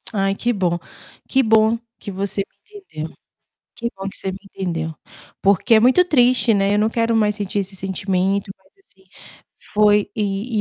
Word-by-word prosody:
Ai, 195 0 +1
que 240 +3 0
bom, 180 -4 0 0.5
que 265 - +3
bom 220 -1 +4 0.2
que 205 - -7
você 195 +1 -2
me 420 - -12
entendeu, 160 - -8 0.6
que 235 0 -2
bom 195 0 -5
que 195 - -10
você 190 - -4
me 190 - -8
entendeu. 170 -5 -4 0.5
Porque 200 +4 +3
é 220 - +6
muito 255 +10 +5
triste, 250 -7 +3
né, 200 0 +2
eu - - +2
não 215 - +3
quero 230 0 +1
mais 210 -1 +2
sentir 205 -1 -2
esse 195 0 -6
sentimento, 190 +1 -1
mas 190 0 -31
assim 190 - -25 0.7
foi 210 -1 +4
e 210 +2 -2
200 Hz, 175 wpm, -20 LUFS, 195-225 Hz, 0.7 s, é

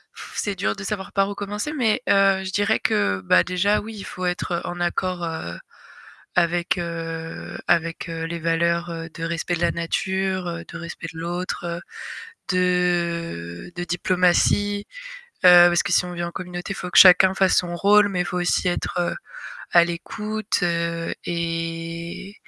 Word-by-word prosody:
pff - - -10
c'est 205 -2 -2
dur 195 - -1
de 195 - -8
savoir 195 -1 -4
par 195 0 +2
où 205 - -5
commencer, 210 +8 -4
mais, 245 -4 +1
heu, 195 -1 +4
je 190 - -5
dirais 205 +2 +1
que, 95 -2 +1
bah, 90 -1 +4
déjà 200 +4 +1
oui, 225 +2 -8
il 200 - -7
faut 185 - -6
être 180 -1 -1
en 175 - -5
accord, 175 0 -1
heu, 160 - -4 0.8
avec, 175 +1 +1
heu, 165 -1 -5
avec, 165 +1 +1
heu, 165 0 -4
les 170 +1 -4
valeurs, 170 +1 0
heu, 165 0 -5
de 165 - -5
respect 170 +1 -2
de 170 - -3
la 170 - +3
nature, 185 0 -2
de - - -9
respect 170 0 -7
de - - -9
l'autre, 175 0 -4 0.7
de 175 - -1
de 175 - -3
diplomatie, 185 +3 +2 0.6
heu, 175 -1 +9
parce 175 0 +2
que - - -3
si - - +4
on 180 - -6
vit 175 0 -4
en 170 - -4
communauté, 175 +1 -6
il - - -7
faut 180 - -5
que - - +4
chacun 190 0 +8
fasse 190 -1 +3
son 175 -1 +1
rôle, 205 +3 +5
mais 185 -3 -2
il 180 - 0
faut 180 - -3
aussi 175 +1 +1
être 175 0 -1 0.6
à 170 -1 +7
l'écoute 210 +5 -3 0.6
et 165 +2 -4
175 Hz, 170 wpm, -23 LUFS, 170-190 Hz, 0.8 s, heu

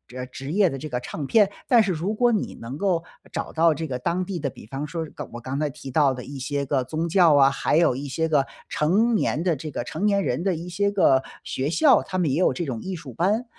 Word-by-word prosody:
呃， 125 0 -4
职 135 +3 -7
业 195 -1 +4
的 135 - -5
这 155 +3 -6
个 125 - -3
唱 140 +3 -5
片， 210 0 +4 0.2
但 235 -3 +6
是 200 - 0
如 180 +5 -2
果 240 +2 +3
你 215 - -1
能 120 +4 -6
够 180 -2 0 0.3
找 - - -3
到 165 0 +3
这 160 +2 -4
个 125 -2 -4
当 175 +8 -1
地 180 -2 -4
的， 145 -3 -2
比 - - -13
方 135 +6 -5
说 165 +2 -4
刚 145 - -7
我 120 - -7
刚 130 +3 -4
才 150 -1 0
提 140 -1 -9
到 140 -1 +3
的 125 -1 -7
一 140 +2 -8
些 140 +2 -2
个 135 -2 0
宗 160 +4 -2
教 170 -3 +5
啊， 135 -1 +6
还 140 - 0
有 165 -4 +4
一 140 +3 -5
些 160 +4 -1
个 145 -3 +2 0.2
成 205 +10 +2
年 170 -6 0
的 175 -4 +1
这 155 +3 -6
个 125 - -3
成 160 +10 -3
年 200 -1 +2
人 125 0 -1
的 185 -1 0
一 170 +2 -6
些 200 +3 +1
个 160 -10 +4 0.2
学 135 +2 -2
校， 275 - +5
他 185 - -5
们 170 -6 +1
也 140 - +1
有 185 - +3
这 175 - -3
种 125 -6 -4
艺 190 0 -4
术 145 -6 -9
班。 205 - +1
155 Hz, 290 characters per minute, -24 LUFS, 135-185 Hz, 0.3 s, 但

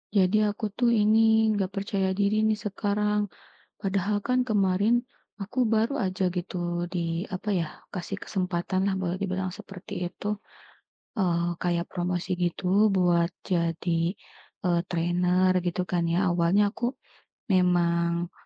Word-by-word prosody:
Jadi 190 +1 +4
aku 210 0 -3
tuh 240 +4 +1
ini 220 +1 +4
gak 190 -1 -1
percaya 195 -1 -1
diri 205 +1 +2
nih 215 - +2
sekarang. 210 0 -1 0.5
Padahal 200 0 0
kan 250 +5 +1
kemarin 210 +1 +2 0.3
aku 215 +6 -1
baru 225 +3 +2
aja 185 0 0
gitu 180 0 -4 0.3
di, 170 -1 -2
apa 200 +2 -2
ya, 170 -3 0 0.3
kasih 175 -3 -4
kesempatan 185 -1 -2
lah - - 0
boleh 180 -2 -1
dibilang 185 -1 -2
seperti 195 -3 -9 0.2
itu, 210 +3 -3 0.8
eee, 175 -4 +1
kayak 175 -1 0
promosi 180 +1 -2
gitu 185 +4 +2
buat 175 -2 +2 0.2
jadi, 170 -1 0 0.7
eee, 170 -1 +2
trainer 180 +2 +2
gitu 175 0 -1
kan 175 -1 0
ya. 185 +3 +2
Awalnya 175 +3 +3
aku 240 0 -1 0.6
memang, 170 -1 +2
185 Hz, 130 wpm, -27 LUFS, 175-210 Hz, 0.8 s, Jadi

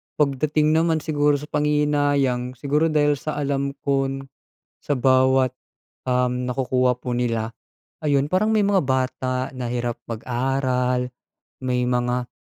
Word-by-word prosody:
pagdating 150 +2 +1
naman 160 -1 +2
siguro 145 -1 +2
sa 150 +1 -6
panghihinayang, 145 -4 +1
siguro 145 +5 +1
dahil 145 -2 +2
sa 155 +3 -4
alam 140 -1 -1
kong 135 -1 0 0.6
sa 145 - -2
bawat, 130 0 +3 0.5
um, 125 0 0
nakukuha 125 -1 +1
po 125 -1 -3
nila. 115 -2 -1 0.5
Ayun, 145 -1 +1
parang 205 +4 +3
may 210 - +3
mga 200 -2 +3
bata 130 0 -1
na 125 -2 -4
hirap 120 -1 -2
mag-aral, 125 +1 -1 0.5
may 125 -1 0
mga 125 0 0
130 Hz, 125 wpm, -23 LUFS, 125-145 Hz, 0.6 s, bawat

